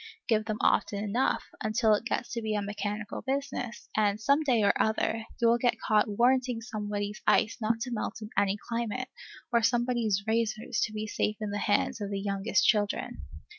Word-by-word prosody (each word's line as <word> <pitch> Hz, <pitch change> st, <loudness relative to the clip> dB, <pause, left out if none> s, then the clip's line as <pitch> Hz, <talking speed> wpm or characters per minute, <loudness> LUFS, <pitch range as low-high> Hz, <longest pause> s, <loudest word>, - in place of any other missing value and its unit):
Give 215 Hz, -2 st, +2 dB
them 215 Hz, -1 st, -2 dB
often 205 Hz, 0 st, +2 dB
enough, 230 Hz, +6 st, +1 dB, 0.2 s
until 215 Hz, 0 st, +3 dB
it 210 Hz, +2 st, 0 dB
gets 240 Hz, -, -2 dB
to 235 Hz, -, -2 dB
be 215 Hz, -1 st, -1 dB
a 205 Hz, -, 0 dB
mechanical 205 Hz, +1 st, -4 dB
business, 270 Hz, -3 st, -3 dB
and, 210 Hz, -1 st, +2 dB
some 280 Hz, +7 st, +3 dB
day 250 Hz, -8 st, +2 dB
or 200 Hz, -, +5 dB
other, 220 Hz, +1 st, 0 dB
you 235 Hz, -, +4 dB
will 235 Hz, +1 st, +4 dB
get 240 Hz, -2 st, +1 dB
caught 215 Hz, 0 st, +2 dB
warranting 245 Hz, +3 st, +2 dB
somebody's 210 Hz, -2 st, -4 dB
ice 225 Hz, -, +3 dB
not 225 Hz, +1 st, 0 dB
to 250 Hz, +1 st, -3 dB
melt 220 Hz, -2 st, -3 dB
in 215 Hz, -1 st, -8 dB
any 200 Hz, 0 st, +2 dB
climate, 235 Hz, +2 st, -2 dB, 0.4 s
or 235 Hz, -, +5 dB
somebody's 235 Hz, -4 st, +1 dB
razors 220 Hz, 0 st, 0 dB
to -, -, -8 dB
be 215 Hz, 0 st, -4 dB
safe 215 Hz, 0 st, -1 dB
in 210 Hz, -1 st, -3 dB
the 205 Hz, -, -2 dB
hands 205 Hz, +2 st, +1 dB
of 200 Hz, -, -3 dB
the 200 Hz, -1 st, -2 dB
youngest 200 Hz, +1 st, +1 dB
children. 205 Hz, -2 st, +1 dB
215 Hz, 190 wpm, -29 LUFS, 205-235 Hz, 0.4 s, or